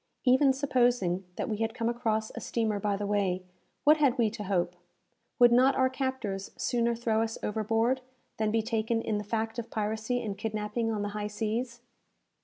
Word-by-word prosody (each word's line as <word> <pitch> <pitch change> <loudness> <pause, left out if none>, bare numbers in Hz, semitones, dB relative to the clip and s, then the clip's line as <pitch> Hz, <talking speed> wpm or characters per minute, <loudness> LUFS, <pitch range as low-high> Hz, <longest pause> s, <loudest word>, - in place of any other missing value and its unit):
Even 260 +2 +5
supposing 245 -9 +1
that - - -3
we 215 -3 -2
had 225 +1 -2
come 230 -2 -1
across 225 -2 -1
a - - -7
steamer 220 -3 -1
by 205 0 0
the 205 - -3
way, 195 -3 0 0.4
what 305 +2 +6
had 275 -4 +3
we 225 -3 +2
to 210 - -6
hope? 180 -2 0 0.6
Would 240 -2 +7
not 255 +3 +5
our 260 0 +3
captors 260 -8 -3
sooner 235 -1 +1
throw 225 -1 +1
us 225 0 -2
overboard, 225 +4 +1 0.4
than 215 -1 +1
be 220 +1 +1
taken 225 0 0
in 210 -1 -1
the - - -4
fact 225 +2 -2
of 235 - -6
piracy 220 +3 -1
and 205 -3 -3
kidnapping 220 +1 -2
on 210 -2 -2
the 205 - -2
high 210 0 -3
seas? 230 +3 -3
225 Hz, 190 wpm, -29 LUFS, 210-240 Hz, 0.6 s, Would